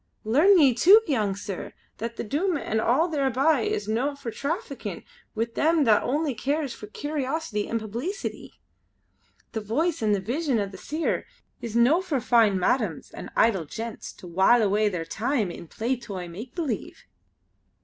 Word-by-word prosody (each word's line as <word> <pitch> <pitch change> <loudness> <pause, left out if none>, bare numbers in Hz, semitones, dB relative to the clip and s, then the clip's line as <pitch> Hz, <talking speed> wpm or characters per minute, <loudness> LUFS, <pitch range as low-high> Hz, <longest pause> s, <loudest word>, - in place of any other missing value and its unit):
Learn 305 - +5
ye 280 -6 +6
too, 375 - +7
young 215 -9 0
sir, 200 -1 -6 0.3
that 230 +1 -4
the - - -4
Doom 315 - 0
an' 220 -5 -1
all 265 +10 +3
thereby 280 -1 +2
is 205 -2 -2
no 250 +7 0
for 275 -5 -6
traffickin' 330 - -4 0.3
wi' 225 +1 +1
them 310 +7 +2
that 220 -5 +4
only 290 +2 0
cares 280 +3 -1
for 210 - -10
curiosity 290 -2 -3
and 230 - 0
publeecity. 235 - -5 1.0
The 220 - -3
Voice 295 - -1
and 210 -2 +3
the - - -1
Vision 255 - -1
o' 205 - +1
the 195 -1 -10
Seer 310 +2 -2 0.3
is 230 -2 -5
no 255 +9 +4
for 315 -8 -1
fine 225 -4 +4
madams 190 - 0
and - - -8
idle 195 -8 +3
gentles 225 +8 -6
to - - -14
while 190 +7 +4
away 210 +1 +2
their 175 -4 -4
time 220 - -1
in 170 - -9
play 235 +9 -1
toy 200 -7 -7
make 210 +9 -9
believe!" 330 -6 -4
235 Hz, 170 wpm, -26 LUFS, 210-295 Hz, 1.0 s, too